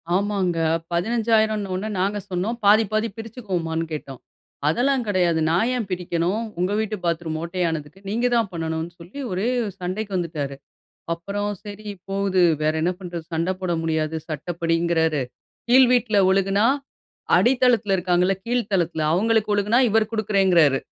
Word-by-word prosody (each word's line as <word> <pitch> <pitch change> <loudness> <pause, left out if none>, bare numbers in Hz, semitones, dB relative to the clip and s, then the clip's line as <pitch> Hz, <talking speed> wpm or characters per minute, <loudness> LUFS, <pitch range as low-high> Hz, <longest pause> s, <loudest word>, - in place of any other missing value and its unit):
ஆமாங்க. 195 -3 0 0.3
15,000 220 +3 +1
ன்ன 185 -1 -3
உடனே 215 - -3
நாங்க 200 +2 0
சொன்னோம் 190 +6 -2
பாதி, 210 +2 +6
பாதி 215 +1 +1
பிரிச்சுக்குவோமான்னு 185 -8 -3
கேட்டோம். 140 -4 -6 0.5
"அதெல்லாம் 255 - +2
கெடயாது 175 -5 +2
நான் 180 +8 +2
ஏன் 240 -4 -2
பிரிக்கணும்? 180 +3 -1 0.2
உங்க 180 +2 +1
வீட்டு 220 -1 -1
பாத்ரூம் 165 -2 -1
ஓட்டையானதுக்கு 170 -1 -3
நீங்க 235 +4 0
தான் 225 -4 +1
பண்ணணும்னு", 160 0 -3
சொல்லி 175 +11 -10
ஒரே 190 +5 -1 0.3
சண்டைக்கு 195 +3 -4
வந்துடாரு. 150 -5 -3 0.6
அப்பறம், 205 +4 -3
சரி 210 0 -8 0.2
போது 195 -1 +1 0.2
வேற 155 0 +2
என்ன 175 +2 +2
பண்றது? 175 -3 -6
சண்ட 165 +3 0
போட 180 -2 -1
முடியாது, 160 -1 -1
சட்டப்படிங்கறாரு. 165 -1 0 0.5
கீழ் 255 +1 +7
வீட்ல 240 -3 +2
ஒழுகுனா, 195 +2 +2 0.7
அடித்தளத்துல 245 -5 +3
இருக்காங்கல்ல, 180 +1 +2
கீழ் 240 -2 0
தளத்துல 170 -4 0
அவுங்களுக்கு 215 +3 +2
ஒழுகுனா, 205 +3 +2
இவரு 220 0 +3
கொடுக்குறேங்றாரு. 190 -9 +3
185 Hz, 135 wpm, -23 LUFS, 170-215 Hz, 0.7 s, கீழ்